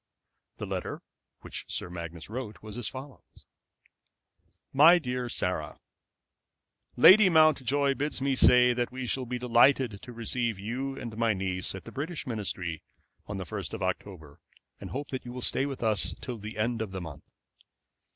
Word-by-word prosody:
The - - -5
letter - - -4 0.4
which - - -6
Sir - - -2
Magnus 85 -1 -7
wrote 110 -2 -7
was 105 -1 -8
as 120 -3 -4
follows: 130 +1 -10 1.3
MY 160 +6 +8
DEAR 125 -5 -3
SARAH, 90 -8 -2 1.2
Lady 190 - +8
Mountjoy 145 -4 +4
bids 145 +2 -2
me 135 0 +1
say 125 -1 +6
that 120 0 -2
we 130 0 -5
shall 130 +1 -2
be 125 +1 -2
delighted 120 -2 +3
to 125 - -10
receive 115 -1 -2
you 130 +7 -4
and 115 -4 -6
my 115 -2 +2
niece 95 0 -2
at 95 - -8
the - - -10
British 160 +4 -4
Ministry 95 - -4 0.5
on 105 - -4
the 95 - -5
1st - - -5
of - - -5
October, 80 -8 -5 0.4
and - - -8
hope 140 +2 -5
that 130 - -4
you 120 - -8
will 125 - -6
stay 135 - +2
with 135 -3 -5
us 110 -2 +1
till 125 -4 -6
the 105 +2 -8
end 115 +2 0
of 105 -4 -4
the 95 - -4
month. 75 -4 -10
120 Hz, 170 wpm, -29 LUFS, 105-135 Hz, 1.3 s, MY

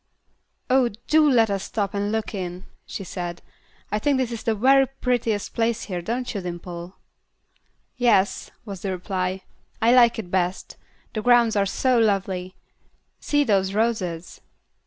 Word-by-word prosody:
"Oh, 255 -1 +3 0.2
do 310 -1 +4
let 225 -5 +4
us 195 -1 -2
stop 200 -3 -2
and 205 0 -1
look 220 0 -2
in," 180 -2 -5 0.2
she - - -6
said. 175 -2 -6 0.5
"I 210 - 0
think 280 +4 +2
this 255 -2 -1
is 230 -1 -5
the 225 -3 0
very 270 +5 +5
prettiest 240 -5 -1
place 230 0 0
here, 180 -3 -4
don't 245 +7 -3
you, 200 - -3
Dimple?" 175 0 -7 1.0
"Yes," 220 -6 +2 0.2
was 195 -4 -7
the 195 - -3
reply, 185 0 -3 0.4
"I 235 +1 +4
like 240 -2 +6
it 190 -6 -6
best. 185 0 -1 0.4
The 215 - -2
grounds 240 -1 +4
are 200 -1 +2
so 255 +4 +2
lovely. 190 -4 0 0.6
See 290 0 +1
those 195 -5 +1
roses." 195 -7 -2
210 Hz, 155 wpm, -24 LUFS, 185-240 Hz, 1.0 s, like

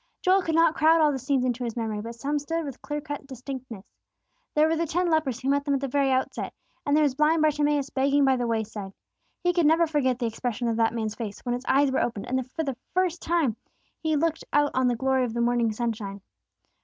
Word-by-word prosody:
Joel 375 +1 +4
could 325 -3 -1
not 330 -1 +5
crowd 325 0 +4
all 305 -2 +4
the 270 - -3
scenes 265 0 0
into 250 0 -1
his 235 -2 -3
memory; 220 -2 -2
but 230 +2 -7
some 285 +5 -1
stood 325 +3 -3
with 275 -4 -8
clear 295 0 -4
cut 290 -1 -6
distinctness. 255 -5 -8 0.7
There 305 +1 +5
were 325 - +1
the 330 +1 -1
ten 350 +3 0
lepers 290 -7 +1
who 265 - -2
met 280 0 +2
them 285 -1 +1
at - - 0
the 275 - -2
very 275 +1 +1
outset; 260 0 -1 0.3
and 285 - +3
there 310 - +4
was 285 -3 +2
blind 305 +3 +3
Bartimeus 295 -2 +1
begging 275 +1 +2
by 265 -1 +4
the 245 -1 -1
wayside. 215 -3 -3 0.5
He 355 0 +2
could 340 -3 +3
never 330 +2 +4
forget 285 -6 +1
the 245 - -2
expression 235 +1 -2
of 225 -1 0
that 230 0 +2
man's 220 -2 -2
face, 215 -4 -6
when 245 - -2
his 245 +2 -4
eyes 275 +1 +3
were 265 - +1
opened, 225 -4 -2
and 255 0 -2
for 320 - -2
the 270 -5 -3 0.2
first 365 -2 +1
time 315 -10 +1 0.4
he 315 -1 0
looked 320 +2 0
out 290 0 +3
on 260 0 +2
the 245 - +2
glory 265 +2 +1
of 235 -2 -3
the - - -1
morning 235 -1 +2
sunshine. 215 -3 -4
270 Hz, 240 wpm, -26 LUFS, 240-305 Hz, 0.7 s, not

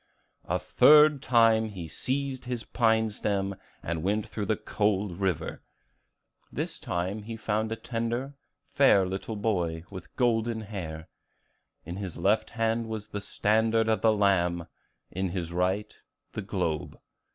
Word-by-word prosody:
The - - +1
third 150 -2 +6
time 115 -3 +4
he 95 -6 -6
seized 130 - -2
his 125 -2 -3
pine 110 -2 +2
stem, 100 -1 -1 0.3
and 85 -1 -2
went 105 +4 0
through 105 -3 -4
the 110 - +2
cold 100 -3 -1
river. 90 -5 -1 0.9
This - - -4
time 90 +5 -2
he 115 +2 -7
found 110 0 -1
a - - 0
tender, 120 +4 -3 0.4
fair 105 -9 +5
little 95 +4 -4
boy, 90 -6 -1
with 95 -2 -10
golden 115 -2 +1
hair. 85 -7 -6 0.8
In 85 +3 -6
his 95 -4 -5
left 105 +3 +2
hand 115 0 0
was 110 -1 -5
the 105 -1 -4
standard 110 +2 +2
of 110 -1 +1
the 110 - +5
Lamb; 90 -5 +2 0.5
in 95 +1 -2
his 85 -2 -4
right, 95 +4 0 0.4
the - - -3
globe. 80 -2 -3
105 Hz, 140 wpm, -28 LUFS, 95-115 Hz, 0.9 s, third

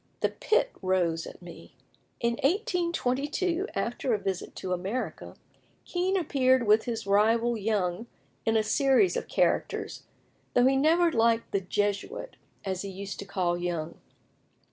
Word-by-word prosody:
the - - +2
pit - - +1
rose 175 -3 0
at - - -12
me." 175 - -12 0.4
In 235 0 +1
1822, 340 - 0
after 240 0 0
a - - 0
visit 195 -2 -4
to 185 -1 -3
America, 195 +8 -4 0.5
Kean 370 +2 0
appeared 260 -7 +2
with 215 +1 +4
his 230 -4 -3
rival 225 +4 +3
Young 205 -1 -1 0.4
in 225 0 +2
a 220 - +2
series 270 - +3
of 485 - -3
characters, - - 0 0.5
though 245 - +5
he 265 +1 +4
never 330 +5 +4
liked 230 -2 +2
"the 200 - +1
Jesuit," 205 - -2 0.3
as 190 -1 -2
he 200 - -5
used 195 +1 -7
to 200 - -5
call 180 -3 -1
Young. 170 -2 -3
225 Hz, 145 wpm, -28 LUFS, 195-275 Hz, 0.5 s, though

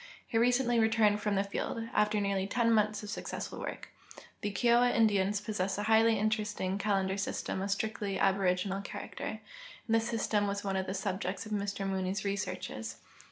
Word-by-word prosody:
He - - -8
recently 245 0 +3
returned 220 -2 +3
from 210 -1 0
the 195 - +2
field, 200 +3 -3
after 210 0 +2
nearly 200 -1 0
ten 230 +2 +2
months 215 -1 +2
of 210 - -6
successful - - -5
Avork. - - -5 0.6
The 205 - -2
KioAva 240 +3 +3
Indians 205 -3 +3
j)0ssess 200 -3 -2
a 205 - -1
highly 220 +1 +4
interesting 210 -2 -1
calendar 195 -2 +1
system 195 -1 -2
of 195 - -2
strictly 200 -1 -1
aboriginal 195 0 +1
character, 195 - -6 0.5
and 225 - 0
this 225 +1 +1
system 215 -3 +1
Avas 200 0 -2
one 195 -1 -1
of 190 0 -1
the 190 - -2
subjects 190 +1 -3
of 215 - -9
Mr 200 -1 -2
Mooney's 190 +1 -2
researches. 115 - -3
205 Hz, 170 wpm, -31 LUFS, 195-220 Hz, 0.6 s, highly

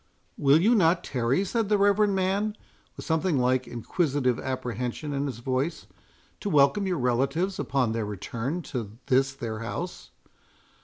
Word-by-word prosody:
"Will 140 +2 +4
you 215 +8 +4
not 175 -5 +3
tarry," 130 +8 0
said 225 +1 -1
the 210 - +4
reverend 200 0 +3
man, 200 +3 0 0.4
with - - -8
something 160 -1 +1
like 130 0 +1
inquisitive 130 +1 0
apprehension 125 +2 -3
in 140 +1 -1
his 130 - -5
voice, 130 +6 -2 0.5
"to 205 - -3
welcome 150 +6 +4
your 180 -2 0
relatives 135 +9 0
upon 130 -5 0
their 115 0 -1
return 115 - -4
to 115 -8 -6
this 135 +1 +3
their 115 -5 -5
house?" 60 - -5
140 Hz, 150 wpm, -27 LUFS, 125-185 Hz, 0.5 s, Will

